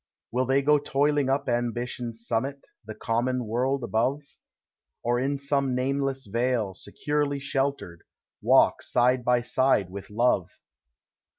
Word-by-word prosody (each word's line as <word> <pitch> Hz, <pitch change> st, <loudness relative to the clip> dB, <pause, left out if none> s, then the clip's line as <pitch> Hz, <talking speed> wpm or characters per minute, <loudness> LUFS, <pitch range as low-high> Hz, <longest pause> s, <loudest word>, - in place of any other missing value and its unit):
Will 125 Hz, +1 st, 0 dB
they 135 Hz, +1 st, +2 dB
go 150 Hz, +1 st, +4 dB
toiling 145 Hz, 0 st, +1 dB
up 135 Hz, +1 st, 0 dB
Ambition's 120 Hz, -1 st, -3 dB
summit. 135 Hz, +5 st, -2 dB, 0.2 s
The 110 Hz, -, -6 dB
common 120 Hz, +2 st, -1 dB
world 125 Hz, +4 st, 0 dB
above? 125 Hz, +6 st, 0 dB, 0.8 s
Or 120 Hz, +1 st, +1 dB
in 140 Hz, +2 st, 0 dB
some 140 Hz, -2 st, 0 dB
nameless 135 Hz, +1 st, -1 dB
vale, 115 Hz, -1 st, 0 dB
securely 145 Hz, -, -2 dB
sheltered. 135 Hz, -10 st, -2 dB, 0.4 s
Walk -, -, +4 dB
side 125 Hz, +1 st, +2 dB
by 125 Hz, 0 st, +3 dB
side 120 Hz, -6 st, +1 dB
with 100 Hz, 0 st, -8 dB
Love? 105 Hz, -4 st, +1 dB
125 Hz, 125 wpm, -26 LUFS, 115-140 Hz, 0.8 s, go